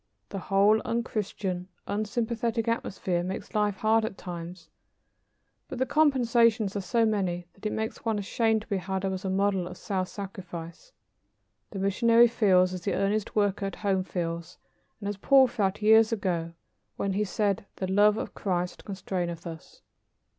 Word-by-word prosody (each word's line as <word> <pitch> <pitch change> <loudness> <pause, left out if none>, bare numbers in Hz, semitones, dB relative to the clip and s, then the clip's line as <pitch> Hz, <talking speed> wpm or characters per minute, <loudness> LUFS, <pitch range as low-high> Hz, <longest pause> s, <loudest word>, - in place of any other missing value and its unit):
The 195 - -4
whole 200 +3 +3
unchristian, 200 -6 -2 0.2
unsympathetic 225 +2 -1
atmosphere 190 -6 -1
makes 190 +5 -5
life 210 -2 +1
hard 220 +2 +2
at 215 -2 -4
times, 170 -1 -8 1.0
but - - -6
the 260 - +1
compensations 240 -8 +3
are 200 - -1
so 225 +5 +2
many 185 -5 -1
that 200 - -5
it - - -3
makes 220 0 -4
one 225 -2 0
ashamed 220 +2 +1
to - - -21
be 200 - 0
held 190 +1 -3
up 190 - -1
as 190 +1 -5
a - - 0
model 190 -1 +1
of 180 0 -9
self 185 -3 -2
sacrifice. 180 - -8 0.8
The 200 - -7
missionary 230 +5 +5
feels, 185 -5 +3
as 180 - -5
the - - -1
earnest 200 +1 0
worker 205 -1 +1
at 195 - -6
home 195 -2 0
feels, 170 -1 -4 0.4
and 200 - -5
as 205 -1 -3
Paul 270 +6 +6
felt 210 -4 -1
years 220 +1 +6
ago, 175 -6 -1 0.4
when 200 -1 -1
he 205 +2 +1
said, 200 0 -1
"The 190 - -3
love 205 +3 +4
of - - -4
Christ 180 -2 -2
constraineth 180 -4 -4
us." 165 -2 -10
200 Hz, 165 wpm, -28 LUFS, 185-220 Hz, 1.0 s, Paul